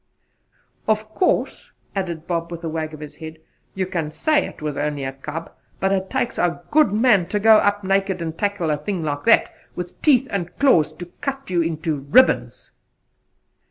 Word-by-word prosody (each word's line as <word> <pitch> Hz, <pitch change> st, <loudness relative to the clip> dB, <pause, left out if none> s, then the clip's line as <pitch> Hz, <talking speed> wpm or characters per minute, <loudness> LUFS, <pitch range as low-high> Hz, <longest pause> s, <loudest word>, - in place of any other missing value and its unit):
"Of 215 Hz, 0 st, +1 dB
course," 370 Hz, -, 0 dB, 0.2 s
added 170 Hz, -4 st, -3 dB
Bob 170 Hz, -1 st, -2 dB
with 170 Hz, 0 st, -7 dB
a 165 Hz, -, -2 dB
wag 155 Hz, -1 st, -4 dB
of 155 Hz, -, -13 dB
his 150 Hz, -1 st, -9 dB
head, 160 Hz, 0 st, -8 dB, 0.4 s
"you 190 Hz, -1 st, 0 dB
can 170 Hz, -4 st, -3 dB
say 300 Hz, -, +1 dB
it -, -, -12 dB
was 150 Hz, -2 st, -3 dB
only 145 Hz, -1 st, -2 dB
a 135 Hz, 0 st, -3 dB
cub; 150 Hz, +4 st, -7 dB, 0.3 s
but 195 Hz, -, +1 dB
it 190 Hz, -1 st, 0 dB
takes 235 Hz, -, -1 dB
a 175 Hz, 0 st, 0 dB
good 305 Hz, -5 st, +4 dB
man 210 Hz, -5 st, +3 dB
to 205 Hz, +3 st, -1 dB
go 220 Hz, +1 st, +7 dB
up 205 Hz, -1 st, +1 dB
naked 195 Hz, -1 st, +1 dB
and 165 Hz, -1 st, -4 dB
tackle 200 Hz, -5 st, -1 dB
a 150 Hz, -, +1 dB
thing 175 Hz, +3 st, -3 dB
like 145 Hz, -2 st, -3 dB
that, 230 Hz, -, +4 dB, 0.2 s
with 180 Hz, 0 st, -7 dB
teeth 270 Hz, -4 st, +4 dB
and 175 Hz, -4 st, -4 dB
claws 215 Hz, -, +4 dB
to 175 Hz, -, -8 dB, 0.2 s
cut 275 Hz, -3 st, -4 dB
you 175 Hz, -2 st, +2 dB
into 160 Hz, -1 st, -1 dB
ribbons." 145 Hz, -, +2 dB
175 Hz, 190 wpm, -22 LUFS, 160-205 Hz, 0.4 s, go